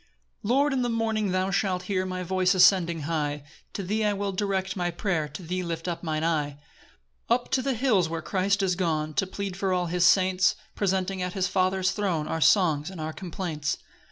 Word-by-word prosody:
1 205 - -5
Lord, 280 +2 +3
in 260 - +1
the 245 - 0
morning 220 -2 0
thou 185 +1 0
shalt 190 -2 0
hear 185 0 -1
My 185 0 -3
voice 185 +1 +2
ascending 175 -3 +4
high; 150 -2 -2 0.3
To 200 - -4
thee 210 +3 0
will 200 0 -2
I - - -8
direct 190 -1 -1
my 175 -2 -1
prayer, 170 -3 -1
To 180 - -9
thee 180 +2 -2
lift 165 -1 -4
up 170 -1 -3
mine 155 -2 -2
eye; 150 -3 0 0.7
2 235 - +5
Up 245 - -6
to 260 - +2
the 270 0 -1
hills 220 -9 +2
where 165 0 -4
Christ 195 +1 +1
is 185 -1 +2
gone 155 -4 -1
To 185 +7 0
plead 195 -1 -5
for 190 0 -1
all 180 -1 +1
his 175 +1 0
saints, 185 0 +4 0.2
Presenting 190 -1 -1
at 180 0 -2
his 190 -2 0
Father's 185 0 +1
throne 185 -7 -1
Our 160 +1 -2
songs 160 -5 +3
and 190 -3 -9
our 155 0 -4
complaints. 170 -5 -3
185 Hz, 215 wpm, -26 LUFS, 170-195 Hz, 0.7 s, 2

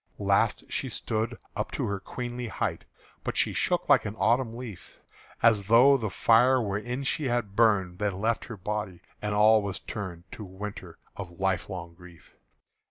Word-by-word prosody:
Last - - +2
she - - -2
stood 110 +2 -2 0.2
up - - -2
to - - -1
her 100 -1 -2
queenly 120 +4 -5
height, 110 - -3 0.4
But - - -3
she - - +2
shook - - 0
like - - +5
an 105 - -5
autumn 115 +3 +1
leaf, 120 -7 -10 0.4
As 110 -4 +4
though 125 +5 +7
the 115 -5 -1
fire 120 +6 +4
wherein 120 +5 -3
she 140 +1 0 0.3
burned 100 -5 +2
Then 100 -2 -1
left 115 +3 0
her 115 - -8
body, 105 -2 -4 0.2
and 105 0 -2
all 110 +1 +6
were 100 -1 -3
turned 95 -4 -6
To 110 - -8
winter 95 -3 -8 0.2
of 90 -3 -9
life 95 -1 0
long 85 -3 -6
grief. 85 -1 -17
105 Hz, 165 wpm, -28 LUFS, 95-115 Hz, 0.4 s, though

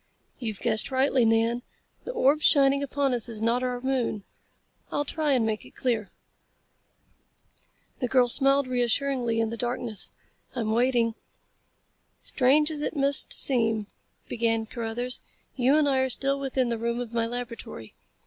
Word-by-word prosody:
"You've 220 -6 -5
guessed 220 -3 +2
rightly, 265 -2 +2
Nan. 225 +2 +2 0.4
The - - -4
orb 300 - +2
shining 275 -1 +4
upon 280 -1 0
us 240 -1 -2
is 220 -2 -4
not 230 +3 +1
our 250 -1 -2
moon. 245 -5 -1 0.7
I'll 290 - -1
try 300 0 0
and 245 -4 +2
make 215 -1 -2
it - - -16
clear." 230 -5 -1 1.9
The 250 - -1
girl 250 0 +3
smiled 275 +2 +3
reassuringly 245 -1 0
in 225 -1 0
the 230 - -5
darkness. 240 -3 -3 0.5
"I'm 225 -3 -1
waiting." 235 0 +2 1.1
"Strange 295 +4 +3
as 300 -1 -4
it 300 - -3
must 280 0 +2
seem," 225 -5 +2 0.4
began 225 -1 0
Carruthers, 235 +2 -4 0.4
"you 265 +3 +3
and 305 -2 +3
I 270 -2 +2
are 260 0 +1
still 275 +2 +1
within 265 -2 -1
the 230 -1 -2
room 235 +1 -2
of 240 -2 -6
my 230 -1 0
laboratory. 235 - -7
245 Hz, 150 wpm, -26 LUFS, 230-270 Hz, 1.9 s, shining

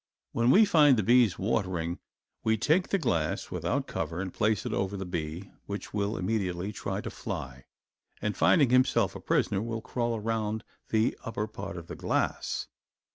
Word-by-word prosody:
When 115 +1 +2
we 210 +10 +7
find 150 - +6
the 110 - +1
bees 120 -2 +4
watering 95 -5 -1 0.4
we 110 0 +2
take 155 - +2
the 195 - +2
glass, 85 - -1
without - - -1
cover, 85 +1 -3
and 95 -1 -4
place 110 -1 +1
it - - -2
over 95 +1 -1
the 95 - -4
bee, 85 +1 -4 0.2
which 100 0 -6
will 100 +1 -1
immediately 95 -1 -1
try 100 - -3
to - - -6
fly 65 -1 -6 0.5
and 105 - -2
finding 140 -8 +4
himself 125 -5 +3
a - - -5
prisoner, 100 -1 +1
will 115 0 -3
crawl 120 0 -1
around 110 -1 -2 0.3
the 110 0 +2
upper 110 -3 -2
part - - -7
of - - -7
the - - -7
glass. - - -1
105 Hz, 175 wpm, -29 LUFS, 95-115 Hz, 0.5 s, we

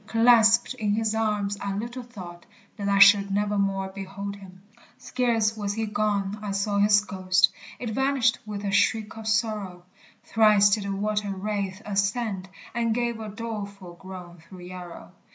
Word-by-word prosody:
Clasped 230 +1 +5
in 210 -5 -1
his 220 0 0
arms, 210 -2 -1
I 200 -1 -3
little 235 +5 -5
thought 185 -8 -11 0.3
That 200 -1 -3
I 200 - +3
should 200 0 +7
nevermore 195 -1 0
behold 195 +1 -6
him! 190 -1 -14 0.3
Scarce 230 -4 0
was 205 -1 -3
he 225 0 -1
gone, 205 -1 -1
I 210 - -5
saw 200 +1 0
his 205 0 +5
ghost; 185 -1 +2 0.3
It 235 -3 -5
vanished 265 -1 +1
with 210 -1 -6
a 200 - -1
shriek 215 +1 +1
of 220 -1 -8
sorrow; 215 -5 -1 0.4
Thrice 210 -2 +4
did 200 0 +1
the 200 - -3
water 210 0 -1
wraith 200 0 -3
ascend, 200 -1 -1 0.2
And 230 -1 0
gave 235 -1 -1
a 215 -1 -6
doleful 200 -4 -7
groan 180 -1 -10
through 180 +3 -14
Yarrow. 180 -1 -10
205 Hz, 160 wpm, -25 LUFS, 195-220 Hz, 0.4 s, should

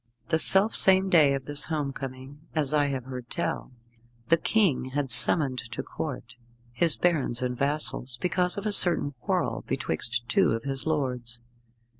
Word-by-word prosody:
The 160 - 0
self 195 +6 +3
same 190 0 +6
day 150 -5 +3
of 135 -1 -8
this 145 0 +3
home 150 -4 -4
coming 135 +1 -10 0.2
as 150 -2 -2
I 145 -1 +1
have 135 -3 -5
heard 125 -1 -10
tell 170 - -5 0.6
the 165 - +4
King 180 - 0
had 135 0 -5
summoned 130 +2 +6
to - - -6
Court 125 -6 -8 0.3
his 165 +6 +3
barons 140 -8 -1
and 125 0 -4
vassals 140 -2 -3
because 180 +2 -1
of 200 - -7
a 210 - -2
certain 175 -7 +4
quarrel - - -3
betwixt 115 +8 -3
two 120 - +1
of 115 0 -5
his 135 +1 -5
lords. 125 -6 -3
140 Hz, 165 wpm, -25 LUFS, 125-160 Hz, 0.6 s, same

